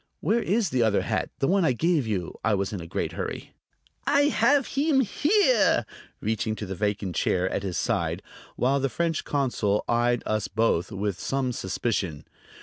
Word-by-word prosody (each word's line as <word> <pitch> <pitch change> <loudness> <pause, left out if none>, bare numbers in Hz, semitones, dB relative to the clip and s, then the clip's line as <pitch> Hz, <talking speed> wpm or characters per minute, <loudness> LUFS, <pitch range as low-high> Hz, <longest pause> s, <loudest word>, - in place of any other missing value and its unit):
"Where 230 +3 +1
is 200 -2 0
the 130 - +1
other 110 -3 +2
hat: - - -1
the 135 - 0
one 195 0 +3
I 155 - +3
gave 155 -1 +1
you?" 95 -6 -3
I 110 -1 +2
was 100 +1 -2
in 100 - -4
a 85 - -8
great - - -2
hurry. - - -5 0.6
"I 285 +1 +4
have 285 -2 +3
heem 280 -1 +2
here," 405 - +3 0.3
reaching 110 0 -1
to 110 - -5
the 95 - -5
vacant 100 -2 -2
chair 90 +3 +1
at - - -1
his 95 -3 -3
side, - - -1 0.3
while 135 +3 +2
the 135 0 0
French 165 +2 -1
consul 120 -7 0
eyed 120 0 +1
us 110 -1 -1
both 100 -5 0
with 100 -1 -3
some 135 -2 -1
suspicion. 95 -7 -2
120 Hz, 180 wpm, -26 LUFS, -, 0.6 s, I